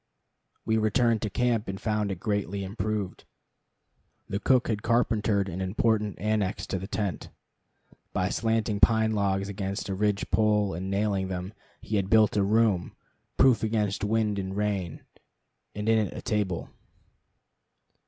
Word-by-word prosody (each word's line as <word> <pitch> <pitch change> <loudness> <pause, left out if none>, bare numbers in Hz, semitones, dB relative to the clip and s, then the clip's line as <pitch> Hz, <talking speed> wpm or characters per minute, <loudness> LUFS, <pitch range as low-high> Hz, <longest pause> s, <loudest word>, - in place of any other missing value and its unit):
We 110 0 +2
returned 115 +1 +2
to 110 - -2
camp, 120 0 0
and 95 0 -4
found 105 -2 -1
it 95 - -5
greatly 100 -1 -2
improved. 105 0 -3 1.0
The 100 - -2
cook 130 +2 +3
had 105 -2 -1
carpentered 110 -4 +1
an 95 0 -5
important 105 +1 0
annex 105 -1 -1
to 95 - 0
the 95 - -6
tent. 100 -7 -3 0.8
By 95 0 0
slanting 110 -1 0
pine 110 0 +4
logs 100 -2 0
against 100 0 -4
a - - -1
ridge 105 +1 -1
pole 105 -3 +2
and 90 +3 -4
nailing 100 -1 0
them, 90 +2 -5 0.3
he 105 - -2
had 95 -1 -1
built 110 -1 +4
a 105 - +3
room, 105 -3 +2 0.4
proof 130 -4 +5
against 105 -3 0
wind 105 -1 +1
and 95 0 -4
rain, 100 -6 -2 0.7
and 105 +1 -4
in 110 -2 +3
it - - -9
a - - -5
table. 100 -6 -2
105 Hz, 150 wpm, -27 LUFS, 95-110 Hz, 1.0 s, proof